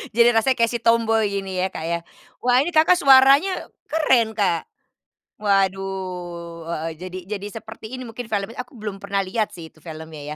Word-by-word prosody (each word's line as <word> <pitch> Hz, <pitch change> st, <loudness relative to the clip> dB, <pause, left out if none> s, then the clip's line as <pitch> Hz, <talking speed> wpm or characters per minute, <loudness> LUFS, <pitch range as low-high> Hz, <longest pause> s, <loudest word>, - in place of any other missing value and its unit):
Jadi 235 Hz, 0 st, +6 dB
rasanya 255 Hz, +4 st, +3 dB
kayak 230 Hz, 0 st, +3 dB
si 240 Hz, -, -2 dB
tomboi 225 Hz, -2 st, +3 dB
ini 190 Hz, -1 st, -6 dB
ya, 190 Hz, -, +2 dB
Kak, 160 Hz, -, -5 dB
ya? 170 Hz, 0 st, -1 dB, 0.4 s
Wah, 250 Hz, +1 st, +4 dB
ini 320 Hz, -, -1 dB
Kakak 320 Hz, +3 st, +5 dB
suaranya 275 Hz, +7 st, +5 dB, 0.2 s
keren, 255 Hz, -8 st, +2 dB
Kak. 185 Hz, -5 st, +1 dB, 0.7 s
Waduh, 185 Hz, -4 st, -2 dB
heeh, 165 Hz, -1 st, -3 dB
jadi 185 Hz, +1 st, -7 dB
jadi 205 Hz, -1 st, -4 dB, 0.2 s
seperti 220 Hz, +1 st, -10 dB
ini 255 Hz, -, -5 dB
mungkin 240 Hz, +2 st, -7 dB
filmnya 215 Hz, 0 st, -3 dB
aku 250 Hz, -, -7 dB
belum 210 Hz, -4 st, -6 dB
pernah 200 Hz, 0 st, -1 dB
lihat 210 Hz, +3 st, -2 dB
sih, 165 Hz, -2 st, -9 dB
itu -, -, -30 dB
filmnya, 160 Hz, -1 st, -9 dB
210 Hz, 175 wpm, -22 LUFS, 185-240 Hz, 0.7 s, Jadi